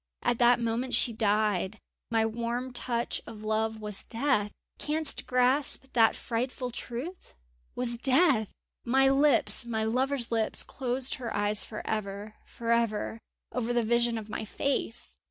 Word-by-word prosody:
At 240 -1 +1
that 240 0 +5
moment 235 +2 -1
she 235 - +2
died! 210 -2 +1 0.3
My 225 -1 +2
warm 235 +3 -3
touch 240 -1 -2
of 215 -1 -9
love 220 0 0
was 210 -2 -5
death! 230 -4 +1 0.3
Canst 310 0 +1
grasp 260 +2 +2
that 225 -2 +5
frightful 250 +2 -3
truth?... 245 - -7 0.4
was 240 -1 -2
death! 265 - +4 0.3
My 265 +2 +4
lips, 280 -1 +3
my 220 -2 -1
lover's 250 +2 0
lips 225 -1 +1
closed 255 0 -2
her 235 -2 -3
eyes 205 0 +1
for 215 - -7
ever!... 210 0 -4
for 230 0 -4
ever... 230 -1 0 0.3
over 245 -1 -1
the 240 -1 +2
vision 235 +1 +2
of 215 -2 -6
my 215 +1 -4
face! 240 +1 -3
235 Hz, 145 wpm, -29 LUFS, 220-255 Hz, 0.4 s, that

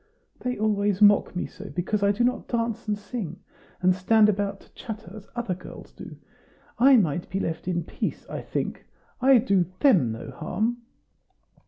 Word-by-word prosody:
"They 250 0 -3
always 205 -2 +1
mock 205 -2 +5
me 180 - -1
so, 200 +1 -10
because 190 +4 -2
I 200 0 +4
do 210 +4 0
not 250 +1 0
dance 230 -2 -2
and 210 -1 0
sing, 205 -5 -6 0.4
and 185 0 +5
stand 210 +4 +4
about 200 -1 -1
to - - -22
chatter, 220 -5 -8
as 210 -2 -11
other 240 -6 -2
girls 180 +1 -11
do. - - -11 0.6
I 265 +2 +7
might 175 -5 0
be 190 - -2
left 165 -2 -3
in 175 -2 0
peace, - - -4
I - - -5
think; - - -4 0.3
I 265 0 +7
do 200 -7 +2
THEM 180 - +4
no 110 - -7
harm." 230 +3 -2
205 Hz, 175 wpm, -25 LUFS, 185-230 Hz, 0.6 s, I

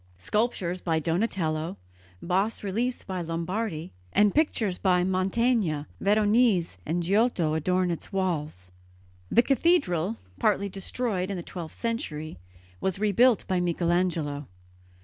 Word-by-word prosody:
Sculptures 185 - -1
by 165 -2 0
Donatello, 165 -1 -1 0.5
bas 195 +6 0
reliefs 230 +6 -1
by 185 -2 -4
Lombardi 170 +1 -3 0.2
and 205 -1 +4
pictures 225 - +1
by 180 -2 +3
Mantegna, 190 -3 +1
Veronese 210 - +3
and 175 +2 0
Giotto 190 -4 +2
adorn 180 +3 +1
its 170 - -6
walls. 155 - -2 0.6
The 235 - +5
cathedral, 230 - +2 0.2
partly 200 - +2
destroyed 195 0 -2
in 195 - -3
the 175 - -5
twelfth 170 -3 -7
century, 155 - -4 0.4
was 190 - -1
rebuilt 215 +3 +3
by 185 -1 +1
Michelangelo. 170 -4 0
185 Hz, 115 wpm, -27 LUFS, 165-215 Hz, 0.6 s, The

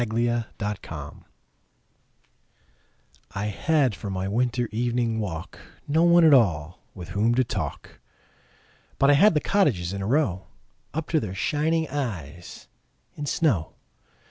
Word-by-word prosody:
Good 120 +1 0 0.3
Hours 75 -3 -8 2.2
I 100 +1 -2
HAD 135 +4 +1
for 100 +1 -7
my 95 0 -3
winter 120 +3 0
evening 120 0 0
walk 80 -6 -5 0.3
No 155 +3 +2
one 170 -1 +6
at 155 - +7
all 90 - +2 0.2
with 90 -2 -9
whom 105 +4 +1
to 130 - +3
talk, - - -5 1.0
But 140 +1 +5
I - - +6
had 180 +6 +5
the - - +4
cottages 120 - +1
in 100 - -4
a 95 - -3
row 115 - 0 0.4
Up 160 +1 -4
to 160 - +2
their 95 -7 -5
shining 160 - 0
eyes 90 - -6 0.5
in 145 - -5
snow. 120 - 0
120 Hz, 135 wpm, -25 LUFS, 95-145 Hz, 2.2 s, at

